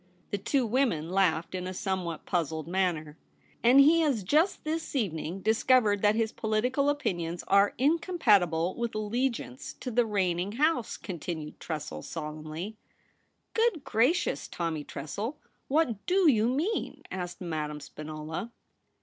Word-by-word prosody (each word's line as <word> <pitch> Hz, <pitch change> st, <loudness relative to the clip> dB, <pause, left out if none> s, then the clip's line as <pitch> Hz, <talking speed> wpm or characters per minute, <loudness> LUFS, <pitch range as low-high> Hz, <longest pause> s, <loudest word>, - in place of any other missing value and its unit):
The 205 Hz, -, -1 dB
two 260 Hz, +5 st, +1 dB
women 220 Hz, -, +1 dB
laughed 185 Hz, -4 st, +2 dB
in 185 Hz, 0 st, -3 dB
a 185 Hz, -, -5 dB
somewhat 180 Hz, -4 st, -3 dB
puzzled 160 Hz, -3 st, -1 dB
manner. 180 Hz, -3 st, +1 dB, 0.2 s
^ -, -, -38 dB, 0.4 s
And 245 Hz, +4 st, +6 dB
he 310 Hz, +4 st, +7 dB
has 280 Hz, -10 st, +1 dB
just 310 Hz, -, +2 dB
this 315 Hz, -1 st, -3 dB
evening 185 Hz, -, -2 dB
discovered 220 Hz, -1 st, +3 dB
that 210 Hz, 0 st, +4 dB
his 225 Hz, -1 st, +1 dB
political 250 Hz, +6 st, +1 dB
opinions 175 Hz, -, -2 dB
are 200 Hz, +1 st, +4 dB
incompatible 210 Hz, -, +3 dB
with 235 Hz, -2 st, -3 dB
allegiance 220 Hz, -, -2 dB
to 250 Hz, -, -4 dB
the 240 Hz, 0 st, +2 dB
reigning 190 Hz, -2 st, 0 dB
house,' 300 Hz, -1 st, +1 dB
con 185 Hz, -6 st, -6 dB
tinued 155 Hz, -1 st, -5 dB
Tressel 145 Hz, -, -5 dB
solemnly. 155 Hz, -, -6 dB, 0.4 s
* -, -, -45 dB
Good 450 Hz, -, +2 dB
gracious, 250 Hz, +11 st, +1 dB
Tommy 165 Hz, -3 st, -3 dB
Tressel, 210 Hz, -, -5 dB, 0.3 s
what 265 Hz, -8 st, +1 dB
do 370 Hz, 0 st, +4 dB
you 220 Hz, -2 st, +2 dB
mean 315 Hz, -, -1 dB
?' -, -, -37 dB
asked 180 Hz, -1 st, -5 dB
Madame 155 Hz, -4 st, -3 dB
Spinola. 155 Hz, +8 st, -6 dB
205 Hz, 145 wpm, -29 LUFS, 170-255 Hz, 0.4 s, he